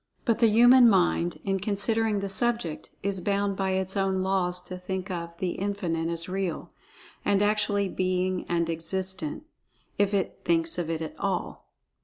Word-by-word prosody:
But 230 Hz, -4 st, +2 dB
the 230 Hz, -, +6 dB
human 240 Hz, +3 st, +7 dB
mind, 85 Hz, -, +2 dB
in 195 Hz, -1 st, 0 dB
considering 210 Hz, +1 st, 0 dB
the 200 Hz, -, -2 dB
subject, 195 Hz, -4 st, 0 dB
is 195 Hz, -1 st, -1 dB
bound 200 Hz, +1 st, 0 dB
by 190 Hz, -1 st, -1 dB
its 190 Hz, +1 st, -1 dB
own 190 Hz, -1 st, +1 dB
laws 185 Hz, -2 st, 0 dB
to 180 Hz, 0 st, -8 dB
think 190 Hz, +1 st, -4 dB
of 170 Hz, -1 st, -5 dB
"The 180 Hz, 0 st, -1 dB
Infinite" 180 Hz, -5 st, -2 dB
as 165 Hz, 0 st, 0 dB
Real, 185 Hz, -2 st, -3 dB, 0.5 s
and 200 Hz, -, +2 dB
actually 205 Hz, -1 st, +1 dB
being 185 Hz, 0 st, -1 dB
and 170 Hz, -1 st, +1 dB
existent, 180 Hz, -, -4 dB, 0.6 s
if 205 Hz, -1 st, +3 dB
it 200 Hz, -3 st, -1 dB
thinks 165 Hz, 0 st, +1 dB
of 165 Hz, -2 st, -2 dB
It 165 Hz, -1 st, -2 dB
at 160 Hz, -, -6 dB
all. 195 Hz, -2 st, -3 dB
190 Hz, 165 wpm, -27 LUFS, 175-200 Hz, 0.6 s, human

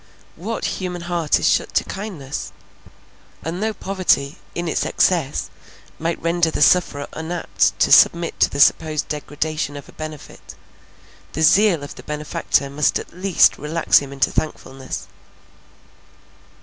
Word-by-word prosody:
What 210 Hz, +8 st, -4 dB, 0.2 s
human 180 Hz, -1 st, -4 dB
heart 170 Hz, -3 st, 0 dB
is -, -, +1 dB
shut -, -, +1 dB
to -, -, +3 dB
kindness? 180 Hz, -9 st, -6 dB, 0.9 s
and 170 Hz, +4 st, -4 dB
though 220 Hz, +1 st, 0 dB
poverty, 185 Hz, -6 st, 0 dB, 0.2 s
in 175 Hz, 0 st, -3 dB
its 155 Hz, -, 0 dB
excess, 155 Hz, -, 0 dB, 0.5 s
might 165 Hz, +1 st, -2 dB
render 170 Hz, 0 st, +1 dB
the 150 Hz, -, +1 dB
sufferer 145 Hz, -4 st, +3 dB
unapt 165 Hz, +2 st, -1 dB
to -, -, +2 dB
submit 170 Hz, 0 st, +5 dB
to -, -, +4 dB
the 140 Hz, -, -5 dB
supposed 155 Hz, +1 st, +3 dB
degradation 150 Hz, 0 st, -3 dB
of 140 Hz, -, -10 dB
a -, -, -14 dB
benefit, 155 Hz, -2 st, -10 dB, 0.8 s
the 160 Hz, -, -1 dB
zeal 175 Hz, -1 st, +4 dB
of 145 Hz, -, -8 dB
the -, -, -12 dB
benefactor 150 Hz, -2 st, -1 dB
must 140 Hz, +1 st, +1 dB
at -, -, -9 dB
last 185 Hz, 0 st, +3 dB
relax 160 Hz, +3 st, +3 dB
him 140 Hz, -1 st, -8 dB
into 135 Hz, -1 st, 0 dB
thankfulness. 135 Hz, -4 st, -4 dB
160 Hz, 140 wpm, -21 LUFS, 145-175 Hz, 0.9 s, submit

